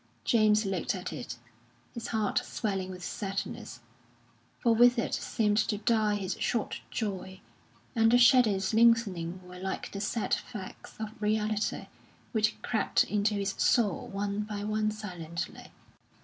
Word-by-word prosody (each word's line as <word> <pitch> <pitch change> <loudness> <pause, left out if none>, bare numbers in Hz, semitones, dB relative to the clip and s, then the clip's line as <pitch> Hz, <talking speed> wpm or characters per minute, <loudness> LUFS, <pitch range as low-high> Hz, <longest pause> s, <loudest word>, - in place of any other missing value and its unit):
James 215 -2 +4
looked 195 +1 -1
at 180 -3 -5
it, 125 -5 -6 0.6
his 235 - -5
heart 215 -3 +1
swelling 195 -4 -3
with 180 -1 -8
sadness; 195 - -5 0.8
for 235 - +3
with 240 +2 +6
it 230 - -1
seemed 210 -1 +1
to 210 0 +1
die 215 -1 +2
his 195 -2 -2
short 230 -4 -1
joy, 190 -3 -4 0.6
and 225 -1 +5
the 245 - +7
shadows 235 -6 +5
lengthening 210 -7 +3
were 180 0 -10
like 190 +1 -4
the 200 - -5
sad 215 +1 -1
facts 210 -6 -5
of 220 +1 -6
reality 215 0 0 0.5
which 215 -2 +1
crept 220 - +2
into 210 0 0
his 200 0 -1
soul 215 -7 +2
one 200 +1 -2
by 210 -1 -4
one 215 0 0
silently. 180 -6 -6
210 Hz, 140 wpm, -30 LUFS, 195-220 Hz, 0.8 s, the